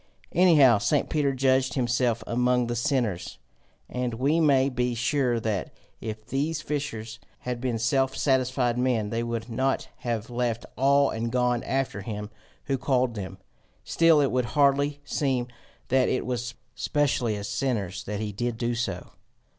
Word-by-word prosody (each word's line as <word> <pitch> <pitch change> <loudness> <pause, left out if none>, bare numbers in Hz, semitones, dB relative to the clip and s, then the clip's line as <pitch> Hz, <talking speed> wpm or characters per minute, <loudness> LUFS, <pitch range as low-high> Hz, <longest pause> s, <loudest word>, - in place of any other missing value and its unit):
Anyhow 150 - +6
St. 145 +7 +1
Peter 145 -3 +2
judged 130 0 +2
himself 120 -2 +1
among 125 +1 +1
the 120 0 -2
sinners, 120 - -1 0.5
and 125 -2 -3
we 140 +7 +2
may 140 -4 +4
be 125 -2 -1
sure 120 0 +1
that 110 -4 -2 0.3
if 110 -1 -6
these 145 +6 -1
fishers 115 -8 -4 0.2
had 125 -1 -4
been 125 -3 -1
self 135 +4 +1
satisfied 130 -3 +1
men, 120 -5 0
they 115 - -1
would 115 -1 -3
not 130 +3 -1
have 115 -2 -3
left 120 -1 -1
all 140 +1 +3
and 115 +1 -3
gone 125 -1 +1
after 135 -6 -2
him 105 0 -6 0.3
who 135 -2 -1
called 130 -2 +1
them. 95 -3 -6 0.5
Still 165 -2 +4
it 140 - +1
would 125 -1 +1
hardly 140 0 +3
seem 130 -4 -1 0.4
that 130 0 +3
it 130 - -1
was 120 -1 -3 0.2
specially 135 -7 0
as 100 0 -5
sinners 100 -8 -2
that 105 0 -4
he 110 -1 -3
did 120 +3 -3 0.2
so. 100 -7 -3
125 Hz, 155 wpm, -26 LUFS, 115-135 Hz, 0.5 s, Anyhow